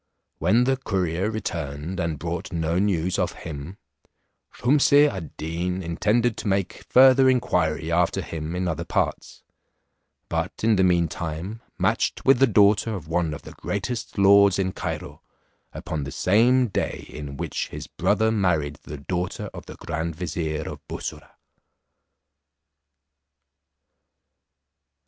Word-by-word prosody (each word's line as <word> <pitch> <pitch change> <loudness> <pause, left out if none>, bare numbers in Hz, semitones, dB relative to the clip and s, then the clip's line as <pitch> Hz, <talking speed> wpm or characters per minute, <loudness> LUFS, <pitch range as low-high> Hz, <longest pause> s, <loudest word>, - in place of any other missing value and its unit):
When 100 +9 +3
the 135 +1 +1
courier 95 -5 -1
returned 85 -5 -4
and 85 -3 -1
brought 85 +2 -4
no 85 +1 0
news 95 -3 0
of - - 0
him, 80 +5 -7 0.7
Shumse 145 +2 +4
ad 95 - -6
Deen 90 +4 -3
intended 110 +8 +1
to - - -5
make 95 -2 -1
further 130 +1 +7
inquiry 85 -10 +1
after 85 0 +1
him 80 +1 -5
in 90 0 -1
other 80 -3 -2
parts; - - -2 0.8
but - - -3
in 110 -1 +4
the 95 - +3
meantime 85 +3 -1 0.2
matched - - 0
with 135 -2 +5
the 135 - +6
daughter 105 +1 +4
of 85 -5 -7
one 85 -1 0
of 75 - -7
the - - -10
greatest 110 +4 -4
lords 100 -1 +6
in 95 -1 0
Cairo, - - -5 0.5
upon 75 -2 -4
the 70 - -6
same 120 - +3
day - - -3
in 70 -2 -8
which - - -3
his - - -7
brother 110 0 +1
married 90 -9 0
the 75 - -8
daughter 90 +5 -4
of - - -10
the - - -9
grand 80 0 -4
vizier, 80 -2 -3
of - - -6
Bussorah. - - -7
90 Hz, 135 wpm, -24 LUFS, 80-105 Hz, 0.8 s, further